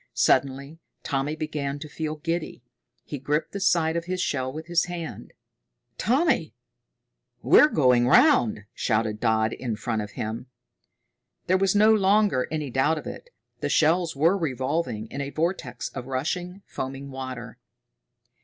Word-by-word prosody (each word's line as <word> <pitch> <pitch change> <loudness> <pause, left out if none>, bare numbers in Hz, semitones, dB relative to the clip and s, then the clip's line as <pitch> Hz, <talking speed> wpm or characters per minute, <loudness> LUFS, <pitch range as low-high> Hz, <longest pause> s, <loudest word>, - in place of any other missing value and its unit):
Suddenly 140 +3 +1 0.2
Tommy 140 +2 -1
began 150 -3 -3
to 150 +1 -8
feel 155 +1 -4
giddy. 165 -4 -4 0.4
He 145 - -6
gripped 150 +4 -1
the 200 - -4
side 170 -4 +2
of 170 0 -2
his 185 +1 -3
shell 130 -7 -1
with 155 +3 -7
his 170 0 +1
hand. 175 -2 -7 0.7
"Tommy, 255 - +1 0.9
we're - - +7
going 125 - +3
round!" 245 - +4
shouted 110 -2 0
Dodd 110 -1 +1
in 120 -4 -3
front 110 0 -2
of 105 -1 -7
him. 110 +4 -5 1.0
There 185 - +2
was 195 0 +2
no 215 +2 +6
longer 200 -8 +3
any 150 -4 -3
doubt 140 +6 +2
of - - -7
it. 485 - -8 0.3
The - - -2
shells 165 +1 +2
were 165 +7 +3
revolving 135 - -2
in 140 - -4
a 140 - -3
vortex 155 -6 -2
of 130 -2 -7
rushing, 180 +8 -3
foaming 135 +1 -6
water. 130 -3 -7
150 Hz, 145 wpm, -25 LUFS, 130-175 Hz, 1.0 s, we're